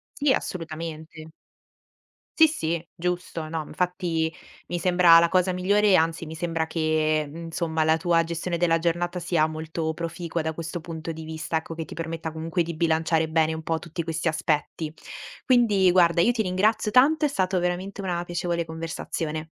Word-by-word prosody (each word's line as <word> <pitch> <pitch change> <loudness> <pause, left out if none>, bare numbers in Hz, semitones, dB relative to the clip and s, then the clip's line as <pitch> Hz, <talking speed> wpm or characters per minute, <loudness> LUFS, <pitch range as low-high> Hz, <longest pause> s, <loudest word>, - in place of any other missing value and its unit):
Sì, 285 -1 +2
assolutamente. 160 -3 -5 1.1
Sì, 320 -1 +8
sì, 170 - -3
giusto. 175 -2 -3
No, 160 -1 -3
m - - -14
Infatti 170 -2 -1 0.4
mi 175 0 -2
sembra 175 -1 +6
la 170 0 +3
cosa 185 0 +2
migliore 200 +3 +2
e - - +7
anzi 165 +1 +1
mi 160 - -7
sembra 165 -1 -2
che 155 -2 0
insomma 165 -1 -2
la 160 0 +4
tua 165 0 +2
gestione 170 +1 -3
della 165 -1 +2
giornata 175 +1 -1
sia 170 -2 +1
molto 160 0 -3
proficua 170 0 -4
da 160 0 -2
questo 165 0 -5
punto 165 0 -6
di 160 0 -8
vista, 160 0 -3
ecco, 160 +1 -6
che 165 -1 -5
ti - - -10
permetta 165 0 -4
comunque 165 +2 -1
di 170 +1 -5
bilanciare 160 0 +1
bene 160 0 +2
un 160 - -5
po' 160 0 -1
tutti 170 +1 -5
questi 160 0 -3
aspetti. 155 0 -1 0.5
Quindi, 210 -8 +4
guarda, 170 -1 +4
io 240 - +4
ti 235 -2 -1
ringrazio 205 +3 +1
tanto, 290 +7 +4
è - - +4
stato 185 -8 0
veramente 185 +3 -2
una 175 -2 -2
piacevole 175 -1 -2
conversazione. 160 -1 -4
165 Hz, 175 wpm, -25 LUFS, 160-180 Hz, 1.1 s, Sì